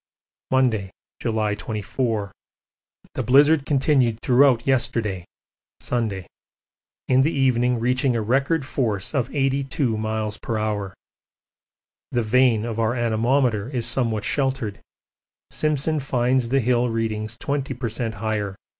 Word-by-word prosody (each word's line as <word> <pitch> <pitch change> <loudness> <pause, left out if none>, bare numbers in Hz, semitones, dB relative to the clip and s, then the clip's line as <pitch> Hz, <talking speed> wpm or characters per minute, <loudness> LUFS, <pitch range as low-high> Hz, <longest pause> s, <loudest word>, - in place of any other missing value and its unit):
Monday, 120 -7 +1 0.3
July 110 -3 0
24. 105 +1 -3 0.8
The - - -2
blizzard 140 +4 +4
continued 135 -5 +2
throughout 125 -2 +4
yesterday 110 -8 0 0.5
(Sunday), 110 -7 -2 0.8
in 130 0 +4
the 145 - +3
evening 125 -3 +2
reaching 125 +2 +1
a 115 - 0
record 135 +6 +1
force 110 -7 -2
of 135 -3 0
82 135 -3 0
m.p.h. 110 -2 -3 1.2
The 120 - 0
vane 115 -1 +3
of 115 -1 -4
our 115 +2 +1
anemometer 120 -1 +1
is 125 -4 -2
somewhat 115 -3 0
sheltered: 130 -7 -1 0.7
Simpson 155 0 0
finds 125 -2 0
the 135 +2 +2
hill 120 +1 +2
readings 110 0 -2
20 140 -1 -2
per 125 0 -3
cent. 115 0 -3
higher. 105 -2 -2
120 Hz, 115 wpm, -23 LUFS, 110-130 Hz, 1.2 s, blizzard